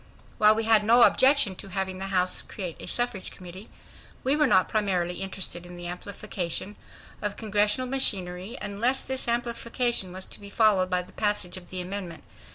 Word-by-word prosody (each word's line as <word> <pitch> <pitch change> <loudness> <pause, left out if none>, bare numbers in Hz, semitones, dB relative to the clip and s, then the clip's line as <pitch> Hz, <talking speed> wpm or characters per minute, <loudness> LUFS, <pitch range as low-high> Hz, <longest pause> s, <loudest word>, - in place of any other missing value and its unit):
While 215 0 +6
we 225 - -1
had 220 -1 +4
no 235 +3 +6
objection 260 -8 +5
to 200 - -8
having 190 0 -3
the 195 - -4
House 185 -1 +3
create 180 -5 -6
a - - -7
Suffrage 240 -6 -2
Committee, 185 +3 -10 0.5
we 270 +3 +3
were 300 -1 +3
not 185 -7 +4
primarily 180 -4 -1
interested 190 -2 -3
in 175 0 -11
the 175 - -8
amplification 180 +1 -4 0.5
of 210 -1 -3
Congressional 210 +3 +1
machinery, 195 -5 +1
unless 235 +6 -1
this 265 -1 -3
amplification 235 -3 0
was 185 +1 -4
to - - -7
be 200 - -10
followed 200 -4 +3
by 180 -1 0
the 180 - -18
passage 205 -4 0
of 185 -1 -10
the 185 -1 -3
amendment. 180 -2 -5
200 Hz, 175 wpm, -26 LUFS, 185-225 Hz, 0.5 s, While